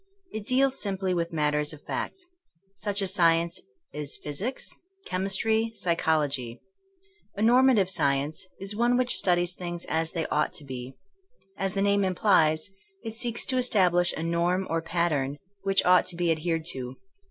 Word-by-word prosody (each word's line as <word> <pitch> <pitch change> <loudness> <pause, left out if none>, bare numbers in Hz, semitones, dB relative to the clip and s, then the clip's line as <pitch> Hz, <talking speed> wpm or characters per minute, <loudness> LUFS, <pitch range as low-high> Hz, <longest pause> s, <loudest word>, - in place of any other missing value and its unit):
It 215 -1 -6
deals 265 +1 +2
simply 190 -2 -1
with 170 -1 -1
mat 150 -2 0
ters 150 +1 -1
of 150 - -13
fact. - - -4 0.6
Such 205 0 -1
a - - 0
science 170 -2 +2 0.3
is 150 -1 -3
physics, 190 - -5 0.2
chem 185 +1 -2
istry, 220 +3 +1
psychology. 145 -8 0 0.8
A 205 - -2
normative 245 -3 +5
science 145 -1 0
is 195 +2 -3
one 240 +2 +2
which 250 0 +4
studies 175 -1 +2
things 175 -1 -6
as 160 0 -1
they 165 -2 -1
ought 150 - 0
to - - -5
be. 130 -1 -7 0.6
As 195 0 -2
the 195 - +1
name 200 0 +3
implies, 175 -3 +2 0.3
it 225 - -5
seeks 235 0 0
to 260 - 0
establish 180 -8 +3
a 160 - -4
norm 170 +3 0
or 165 0 0
pattern 160 -5 -1 0.2
which 195 0 +2
ought 180 0 +5
to 180 - -3
be 170 -1 +1
adhered 165 0 -1
to. 125 -1 -6
175 Hz, 165 wpm, -27 LUFS, 160-200 Hz, 0.8 s, normative